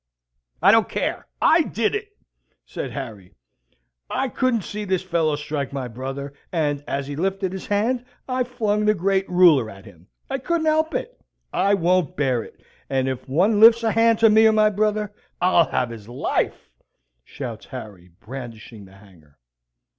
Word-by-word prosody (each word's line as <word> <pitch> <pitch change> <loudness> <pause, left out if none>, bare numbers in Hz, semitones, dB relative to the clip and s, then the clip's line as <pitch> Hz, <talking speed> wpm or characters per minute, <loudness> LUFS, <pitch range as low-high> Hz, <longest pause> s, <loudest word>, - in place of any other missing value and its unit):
"I 195 - +8
don't 225 0 +4
care. - - -3 0.2
I 325 +1 +6
did 230 -7 -1
it," 415 0 -3 0.6
says - - -6
Harry. 110 -10 -8 0.7
"I 270 - -1
couldn't 250 -4 0
see 210 +3 -5
this 190 -2 -1
fellow 165 -4 0
strike 145 -2 -4
my 135 -3 -4
brother; 135 +4 -6 0.2
and, 145 -4 -1
as 140 0 -2
he 145 +1 -6
lifted 190 +3 -1
his 190 - -7
hand, 230 +5 0 0.2
I 255 -1 0
flung 215 -4 -1
the 215 0 +3
great 195 +1 0
ruler 170 -10 +5
at 95 -2 -13
him. 90 -2 -17 0.2
I 270 0 -3
couldn't 335 +4 -1
help 315 +1 +1
it. - - -5 0.3
I 200 +1 +3
won't 180 -3 +1
bear 130 -5 +1
it; - - -14 0.3
and, 130 -1 0
if 130 0 -4
one 195 +10 +2
lifts 230 +1 +7
a 225 - +2
hand 225 0 +4
to 225 -1 +7
me 220 +1 +6
or 220 - +4
my 215 0 +4
brother, 210 0 0 0.3
I'll 175 -2 +3
have 125 -2 -1
his 110 -1 -10
life," 125 +3 -2 0.5
shouts 120 - -8
Harry, 105 -9 -9
brandishing 115 -4 -9
the 95 - -17
hanger. 85 -8 -20
180 Hz, 170 wpm, -22 LUFS, 130-215 Hz, 0.7 s, I